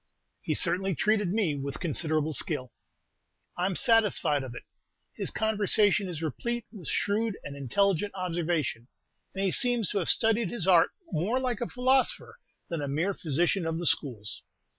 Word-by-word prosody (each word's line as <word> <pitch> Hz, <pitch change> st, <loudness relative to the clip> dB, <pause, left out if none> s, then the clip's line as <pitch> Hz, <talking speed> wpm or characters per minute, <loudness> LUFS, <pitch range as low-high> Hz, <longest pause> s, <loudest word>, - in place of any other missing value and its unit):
"He -, -, -2 dB
certainly 190 Hz, 0 st, +3 dB
treated 210 Hz, +3 st, +1 dB
me 200 Hz, -7 st, 0 dB
with 140 Hz, 0 st, -5 dB
considerable 155 Hz, -2 st, 0 dB
skill." 145 Hz, -, +1 dB, 0.8 s
"I'm 180 Hz, +1 st, -1 dB
satisfied 210 Hz, -, +4 dB
of 130 Hz, -2 st, -8 dB
it; -, -, -9 dB, 0.5 s
his -, -, 0 dB
conversation 210 Hz, -2 st, +2 dB
is 165 Hz, -2 st, -5 dB
replete 235 Hz, -, -3 dB
with 190 Hz, -, -10 dB
shrewd 210 Hz, +1 st, -1 dB
and 140 Hz, -, -7 dB
intelligent 195 Hz, -, 0 dB
observation, 165 Hz, -9 st, -2 dB, 0.5 s
and 195 Hz, -, -2 dB
he 190 Hz, -, +1 dB
seems 245 Hz, -5 st, +2 dB
to 205 Hz, -, 0 dB
have 175 Hz, -, -2 dB
studied 225 Hz, -2 st, +2 dB
his 220 Hz, -5 st, -3 dB
art 175 Hz, -3 st, +5 dB, 0.2 s
more 195 Hz, +10 st, 0 dB
like 250 Hz, -3 st, -2 dB
a 240 Hz, -, -1 dB
philosopher 265 Hz, -, +1 dB, 0.3 s
than 170 Hz, -3 st, -4 dB
a 145 Hz, -, -3 dB
mere 165 Hz, +8 st, -1 dB
physician 170 Hz, +3 st, 0 dB
of 165 Hz, 0 st, -2 dB
the 175 Hz, -, -4 dB
schools. 115 Hz, -10 st, -2 dB
185 Hz, 160 wpm, -28 LUFS, 155-215 Hz, 0.8 s, art